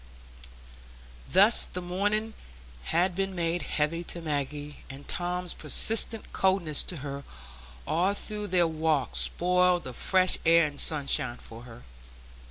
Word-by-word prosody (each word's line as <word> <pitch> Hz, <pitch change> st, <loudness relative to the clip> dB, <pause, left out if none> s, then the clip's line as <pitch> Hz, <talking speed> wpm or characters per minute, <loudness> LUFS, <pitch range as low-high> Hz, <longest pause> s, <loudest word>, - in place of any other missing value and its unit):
Thus 200 Hz, +5 st, +6 dB
the 180 Hz, -, -7 dB
morning 205 Hz, +5 st, -2 dB, 0.5 s
had 175 Hz, +2 st, 0 dB
been 195 Hz, +1 st, -3 dB
made 170 Hz, 0 st, -2 dB
heavy 160 Hz, +3 st, -2 dB
to 170 Hz, -, -4 dB
Maggie, 145 Hz, -2 st, -5 dB
and 135 Hz, +1 st, -11 dB
Tom's 180 Hz, 0 st, -2 dB
persistent 220 Hz, +8 st, +1 dB
coldness 185 Hz, -6 st, +1 dB
to 180 Hz, -, -4 dB
her 140 Hz, 0 st, -6 dB, 0.6 s
all 185 Hz, +5 st, 0 dB
through 210 Hz, 0 st, -5 dB
their 180 Hz, -2 st, +2 dB
walk 160 Hz, -3 st, -1 dB
spoiled 180 Hz, 0 st, +2 dB
the 130 Hz, -, -8 dB
fresh 185 Hz, +6 st, +2 dB
air 165 Hz, 0 st, +4 dB
and 145 Hz, -1 st, -2 dB
sunshine 140 Hz, -5 st, +2 dB
for 115 Hz, +1 st, -11 dB
her. 120 Hz, 0 st, -13 dB
170 Hz, 130 wpm, -27 LUFS, 150-185 Hz, 0.6 s, Thus